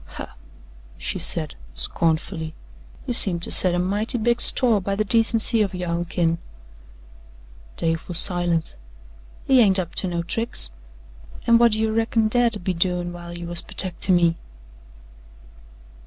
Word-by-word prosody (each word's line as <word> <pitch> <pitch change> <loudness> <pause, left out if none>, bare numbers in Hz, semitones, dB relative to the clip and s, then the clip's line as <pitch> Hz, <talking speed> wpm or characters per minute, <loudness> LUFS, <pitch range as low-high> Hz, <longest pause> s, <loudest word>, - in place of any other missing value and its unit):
"Huh!" - - -9 0.6
she - - -6
said - - -1 0.2
scornfully. 160 0 -3 0.5
"You 250 - -4
seem 185 -6 +7
to - - 0
set 180 -2 +7
a - - -2
mighty 205 +6 -1
big 240 +1 -1
store 235 -6 +3
by 195 +1 -4
the 215 - -1
decency 225 +1 +1
of 195 -3 -3
yo' 180 0 -6
own 170 +1 -3
kin." 165 0 -2 1.4
Dave 165 0 -3
was 175 - 0
silent. 175 - +2 0.7
"He 265 -1 +3
ain't 200 -5 +3
up 175 -3 -5
to 190 - -4
no 170 -1 -4
tricks. 175 - 0 0.7
An' 235 0 +3
whut 235 -2 +3
do 215 - -1
you 220 0 -2
reckon 225 0 -1
Dad 235 0 0
'ud 205 - -10
be 185 - -2
doin' 175 0 -3
while 175 0 -10
you 175 - -9
was 175 0 +4
pertecting 185 0 -1
me?" 170 -1 +1
185 Hz, 155 wpm, -21 LUFS, 170-220 Hz, 1.4 s, seem